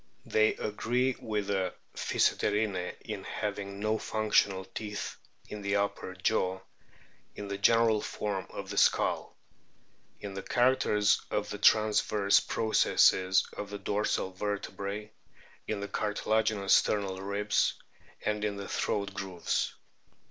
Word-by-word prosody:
They 110 0 +3
agree 125 +5 0
with 105 -2 -2
the 95 -2 -1 0.2
Physeterinae 105 -4 0
in - - -6
having 100 -1 -4
no 110 +1 0
functional 100 -3 +1
teeth 105 0 -5 0.3
in 105 - -7
the 100 0 0
upper 100 -2 -2
jaw; 95 0 0 0.7
in 100 -1 -6
the 100 - -3
general 115 0 +4
form 100 -3 -3
of - - -7
the - - +1
skull; - - +2 0.8
in 100 -1 -6
the 95 - -5
characters 120 -3 +3
of - - -2
the - - -5
transverse 105 -1 +4
processes 95 -4 +3
of 105 - -5
the 100 - -5
dorsal 100 -1 -1
vertebrae; 100 +1 -4 0.6
in 105 -2 -2
the 100 - -3
cartilaginous 105 0 +1
sternal 95 -2 +2
ribs; 100 +1 +1 0.5
and 105 0 0
in 105 -1 -1
the 100 - -6
throat 100 -1 -1
grooves. 95 -3 -2
105 Hz, 125 wpm, -30 LUFS, 100-105 Hz, 0.8 s, general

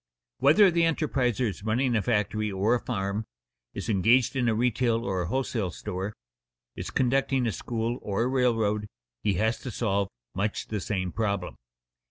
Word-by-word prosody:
_ - - -65 0.4
Whether 175 +8 +6
the 170 0 +2
enterpriser 135 -7 +1
is 100 - -5
running 120 +3 +1
a 110 - +2
factory 110 -1 0
or 100 +4 +2
a 125 - +2
farm, 100 -3 -2 0.5
is - - -4
engaged 115 +6 +3
in 125 -3 +2
a 110 - +1
retail 120 0 +1
or 95 -2 -1
a 85 - -2
wholesale 120 -5 -1
store, 95 +4 -5 0.6
is - - -5
conducting 135 0 +1
a 115 - +1
school, 115 +2 -3
or 100 +3 -1
a - - +1
railroad, 115 -5 +1 0.3
he 100 - +1
has 110 +5 +1
to 130 - -6
solve 100 -4 0 0.3
much 100 +2 -2
the 105 - -2
same 95 -2 -2
problem. 100 -1 -1
115 Hz, 175 wpm, -27 LUFS, 100-125 Hz, 0.6 s, Whether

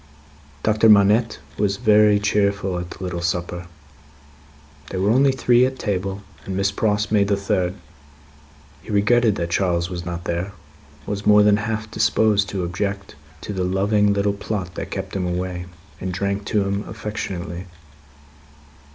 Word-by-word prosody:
Doctor 110 +1 +4
Manette 105 +2 +4 0.2
was 100 -1 +1
very 105 0 +5
cheerful 100 -2 0
at 90 0 -6
the 95 - -9
little 90 -1 -3
supper. 85 0 -3 1.2
They 95 - -4
were 100 +3 +2
only 135 +3 +4
three 125 -1 +3
at 130 +1 0
table, 100 -2 -3 0.2
and 95 -1 -4
Miss 100 0 +1
Pross 105 0 0
made 100 -2 +3
the 100 -1 +1
third. 95 -2 -1 1.1
He - - -15
regretted 110 +1 +3
that 85 -1 -3
Charles 85 -1 0
was 85 -1 -4
not 85 -1 -5
there; 85 +4 -3 0.5
was 100 0 -4
more 105 0 +7
than 105 0 +5
half 110 0 -3
disposed 110 -1 +2
to 95 -2 -3
object 100 +3 -3 0.3
to 105 - -5
the 95 -2 -2
loving 100 +3 +2
little 100 0 +1
plot 100 -3 -4
that - - -6
kept - - -5
him 90 -2 -1
away; 90 0 -3 0.3
and 95 - -3
drank 100 +2 -2
to 105 -1 +1
him 100 +1 -2
affectionately. 95 -4 -5
100 Hz, 155 wpm, -22 LUFS, 90-105 Hz, 1.2 s, more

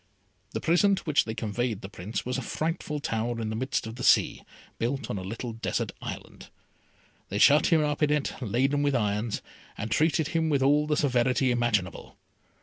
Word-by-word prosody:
The - - -1
prison 185 +4 +3
to - - -7
which 150 -3 +2
they 110 - -4
conveyed 110 0 -2
the - - -6
Prince 100 +2 -5
was 125 +1 -1
a - - -4
frightful 155 +2 -3
tower 115 -2 -2
in 110 -1 -3
the - - -3
midst 130 +1 -1
of 110 +1 -7
the 125 - -6
sea, - - +3 0.4
built 135 +4 -2
on 100 - -3
a - - -6
little 115 +4 -5
desert 115 - -2
island. - - -8 0.8
They 100 - -2
shut 145 +8 +6
him 160 -3 +4
up 150 0 -1
in 150 - +3
it, 150 -2 0
laden 130 +5 +1
with 145 -1 +1
irons, 105 -1 -1 0.3
and 110 +2 -4
treated 155 +3 +2
him 165 -1 0
with 140 -3 +2
all 145 +2 +3
the 150 -1 +1
severity 130 -2 +2
imaginable. 120 -6 -1
125 Hz, 195 wpm, -27 LUFS, 110-150 Hz, 0.8 s, shut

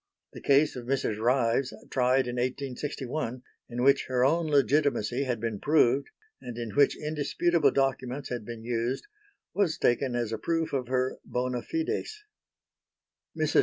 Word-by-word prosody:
The - - -9
case 145 +2 +3
of 120 -1 -7
Mrs. 130 -5 0
Ryves, 125 +2 +1 0.2
tried 130 +1 +3
in 125 0 -4
1861, 130 0 -3 0.3
in 120 +1 -2
which 140 +1 +4
her 125 -1 +2
own 165 +4 +2
legitimacy 140 -3 +2
had 125 -3 -1
been 110 -2 -3
proved 140 -2 +3 0.3
and 120 -1 -7
in 115 -2 -4
which 140 +3 +3
indisputable 155 +1 +1
documents 135 0 -1
had 120 -3 -4
been 115 0 -8
used, 120 +2 -2 0.5
was 180 -4 +1
taken 120 +1 +1
as 120 -2 -1
a 110 - -3
proof 165 -2 -1
of 130 -3 -1
her 130 0 0
bona 125 0 -2
fides. 420 +6 -3 1.1
Mrs. - - +3
130 Hz, 150 wpm, -28 LUFS, 120-145 Hz, 1.1 s, which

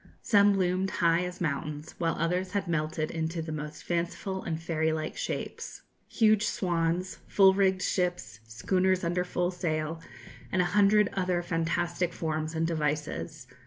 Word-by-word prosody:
Some 205 -2 +5
loomed 185 +1 +1
high 170 -1 +2
as 180 0 -6
mountains, 150 -1 -3
while 165 -2 +1
others 180 +3 -1
had 200 -2 -1
melted 155 -1 -1
into 165 +1 -2
the 160 0 -4
most 150 0 -6
fanciful 175 +2 -2
and 160 -1 -3
fairy 160 -1 0
like 155 0 -3
shapes - - -5 0.3
huge 215 -2 +3
swans, 175 0 -1
full 190 -1 +6
rigged 190 -1 +2
ships, 175 - -1
schooners 185 - +1
under 175 +1 0
full 180 0 -1
sail, 160 -2 -2 0.5
and 190 - +1
a 180 - +4
hundred 205 0 +5
other 180 -2 0
fantastic 170 +1 -1
forms 155 -1 -3
and 160 0 +1
devices. 150 - -2
170 Hz, 150 wpm, -29 LUFS, 160-185 Hz, 0.5 s, full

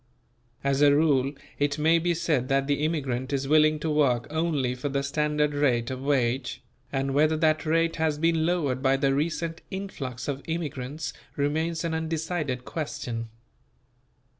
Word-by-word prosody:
As 140 0 +1
a 145 -1 +6
rule 140 -3 +3 0.3
it 145 0 +1
may 160 +2 +4
be 175 +1 +1
said 155 -7 0
that 135 0 +2
the 145 +1 0
immigrant 135 -5 -1
is 135 -1 -1
willing 155 +1 +5
to 160 - -1
work 130 -6 +2
only 155 -6 0
for 125 +3 -4
the 140 0 -1
standard 150 0 0
rate 130 -5 +1
of 130 0 -5
wage; 130 -2 0 0.3
and 135 0 -1
whether 155 +2 +3
that 155 0 +2
rate 165 +1 +2
has 160 -2 +1
been 165 0 +2
lowered 155 -7 0
by 135 0 +3
the 135 0 +2
recent 165 +3 -2
influx 140 -11 -5
of 140 -1 -2
immigrants 150 -3 -4 0.2
remains 160 +4 0
an 165 -1 -1
undecided 160 -5 -2
question. 115 -7 -4
145 Hz, 160 wpm, -27 LUFS, 135-160 Hz, 0.3 s, a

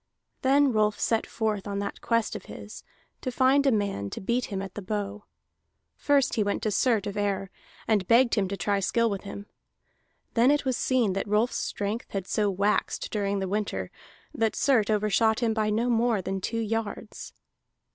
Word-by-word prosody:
Then 275 +1 +4
Rolf 215 -1 +2
set 225 -1 +1
forth 215 -3 -2
on 200 -1 -3
that 200 0 -4
quest 230 -1 0
of - - -7
his, - - -10 0.4
to 255 - -3
find 270 +3 +3
a - - +5
man 200 - -1
to - - -6
beat 235 +5 0
him 195 -2 -4
at 195 -1 -6
the 210 - -6
bow. 205 +1 -4 0.7
First 280 -2 +2
he 220 - +2
went 200 0 -2
to 215 - 0
Surt 220 0 +2
of 205 0 -4
Ere, 200 -2 -1 0.4
and 205 -5 +2
begged 235 +2 +5
him 200 -3 +2
to 200 +1 -4
try 200 0 0
skill 230 +4 +1
with 200 0 -4
him. 200 0 -7 0.9
Then 240 +2 +4
it 290 0 +2
was 260 -1 +1
seen 240 -5 +1
that 195 - -2
Rolf's 215 +4 +1
strength 205 +3 -3
had 195 -2 -2
so 205 +1 +1
waxed 200 +2 0
during 200 -1 -1
the 190 -1 -2
winter, 185 - -2 0.4
that 225 -1 0
Surt 245 -7 +2
overshot 215 +2 +2
him 230 -2 +2
by 215 -1 0
no 225 +3 +1
more 235 -2 +2
than 190 +1 -3
two 230 - -2
yards. 220 -1 -4
215 Hz, 190 wpm, -27 LUFS, 200-235 Hz, 0.9 s, a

